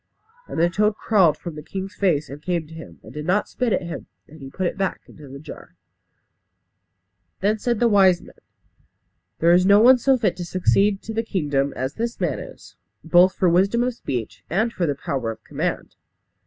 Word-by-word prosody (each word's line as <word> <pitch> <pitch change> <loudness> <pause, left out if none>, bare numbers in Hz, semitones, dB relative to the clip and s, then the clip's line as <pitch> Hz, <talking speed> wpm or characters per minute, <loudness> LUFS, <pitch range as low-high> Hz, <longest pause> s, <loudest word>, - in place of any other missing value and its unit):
And - - -5
the 170 - +4
toad 210 +4 +1
crawled 195 -8 +3
from 170 - -7
the 150 - -8
king's 190 +5 -6
face 165 -7 0
and 140 +2 -10
came 170 -1 -2
to 160 - -14
him, 165 0 -11
and - - -13
did 150 - -6
not 185 +6 +1
spit 250 -3 -2
at - - 0
him; 170 0 -7 0.2
and 155 +2 -15
he 135 - -8
put 185 +6 -3
it - - -1
back 195 -1 -2
into 150 -2 -14
the 135 +1 -9
jar. 150 +2 -12 1.7
Then 210 +3 +1
said 235 0 -1
the 240 - +4
wise 190 -5 +5
men, - - -15 1.0
"There 170 +1 +4
is 180 +1 +5
no 200 +2 +6
one 250 +3 +7
so 265 +2 +3
fit 200 -7 0
to 180 - -4
succeed 195 +3 +1
to 225 - -6
the 225 - 0
kingdom 145 -10 -1
as 130 +2 -3
this 235 +1 -4
man 170 -8 -1
is; - - -12 0.3
both 180 +3 +4
for 185 - +1
wisdom 195 +7 +3
of 250 0 -1
speech 110 - -5
and 220 +7 0
for 175 - -1
the 145 - -1
power 135 -4 -3
of 115 - -8
command." - - -4
180 Hz, 210 wpm, -22 LUFS, 155-210 Hz, 1.7 s, one